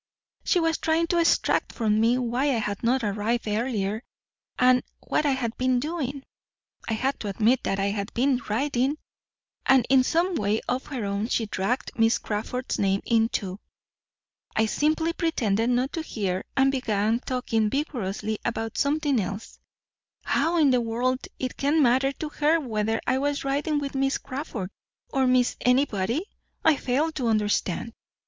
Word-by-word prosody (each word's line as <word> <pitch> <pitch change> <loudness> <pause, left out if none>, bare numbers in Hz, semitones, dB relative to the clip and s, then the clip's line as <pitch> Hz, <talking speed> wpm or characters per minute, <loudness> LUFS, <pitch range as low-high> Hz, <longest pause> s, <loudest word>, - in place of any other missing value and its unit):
She 360 - +2
was 325 -1 +1
trying 325 +1 +2
to 345 - +2
extract 335 - +2
from 215 -2 +1
me 230 +3 +3
why 250 +2 0
I 275 -4 +2
had 210 -2 -3
not 245 +2 +1
arrived 215 +3 -1
earlier 215 -1 -1 0.6
and 250 0 +5 0.2
what 300 - +1
I 280 - +3
had 240 -3 -2
been 255 -1 +2
doing. 280 -2 -3 0.7
I - - +1
had 265 +5 -1
to 210 - -5
admit 225 +6 +2
that 195 - 0
I 200 +1 +1
had 200 0 -3
been 260 +1 +2
riding, 265 +4 0 0.7
and 265 -3 +4
in 265 -1 +6
some 340 +7 +1
way 210 -6 +1
of 250 +2 -2
her 255 -7 -4
own 200 +2 -1
she 235 -2 0
dragged 210 +5 -2
Miss 225 +1 +4
Crawford's 225 +4 -3
name 195 0 +1
in 225 -1 +3
too. 190 -3 -3 1.0
I 220 - +3
simply 315 +7 +1
pretended 235 - 0
not 250 +2 +1
to 325 - -2
hear, 195 -11 -3
and 270 0 +4
began 225 -3 0
talking 235 -4 -1
vigorously 215 -6 -2
about 225 -1 -3
something 285 -2 +1
else. 200 +2 -5 0.6
How 340 +1 +1
in 295 -4 +5
the 250 -1 +3
world 245 +3 -1
it 255 - -4
can 290 +3 +2
matter 260 +2 +3
to 305 +2 -5
her 305 +2 +2
whether 225 -5 -1
I 260 +1 +1
was 285 +1 -1
riding 285 +3 0
with 285 -1 -3
Miss 270 0 +1
Crawford, 255 -8 -5 0.4
or 265 -1 +2
Miss 250 -1 +3
Anybody, 250 - +1 0.4
I 320 -2 +6
fail 280 +7 0
to 265 -6 -2
understand." 215 0 0
250 Hz, 165 wpm, -26 LUFS, 220-275 Hz, 1.0 s, in